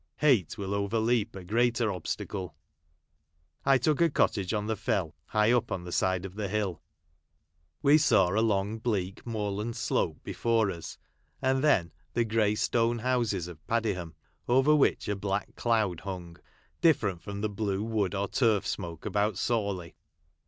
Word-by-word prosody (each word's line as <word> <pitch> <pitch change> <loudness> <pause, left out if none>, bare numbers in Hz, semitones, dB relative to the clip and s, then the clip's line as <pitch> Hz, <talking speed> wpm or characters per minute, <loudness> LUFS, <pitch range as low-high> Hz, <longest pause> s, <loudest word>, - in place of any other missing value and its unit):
Hate 120 - +3
will 100 -1 -3
overleap 110 +2 0
a 95 - -7
greater 115 +2 +1
obstacle. 90 -1 -4 1.1
I 135 -1 +5
took 150 +5 +1
a 170 - +5
cottage 100 - +1
on 105 -2 -1
the 110 +1 -1
Fell, 95 -5 -1
high 105 +1 +3
up 120 -2 +1
on 90 - -2
the 90 - -7
side 95 +1 +1
of 95 - -7
the 105 0 -3
hill. 100 -4 -2 1.0
"We 145 +2 +6
saw 110 - +4
a 105 +4 +1
long 105 0 0
bleak 100 -5 -2
moorland 105 0 -2
slope 85 -9 0
before 115 -3 +1
us, 85 -3 -8 0.4
and 130 +1 +1
then 100 - +3 0.2
the 120 0 +1
grey 105 -1 +2
stone 115 +2 +1
houses 115 -7 0
of 85 -3 -11
Padiham, 100 -8 -1 0.3
over 135 +5 +4
which 145 - +2
a 105 - 0
black 100 0 -3
cloud 110 -7 +1
hxmg; 90 -3 -7 0.4
different 125 - +3
from 100 0 -6
the 110 - 0
blue 100 -1 -2
wood 105 -4 -1
or 100 +1 -1
turf 110 -6 +2
smoke 85 -1 -5
about 105 -1 0
Sawley. 100 -7 -1
105 Hz, 160 wpm, -29 LUFS, 95-115 Hz, 1.1 s, We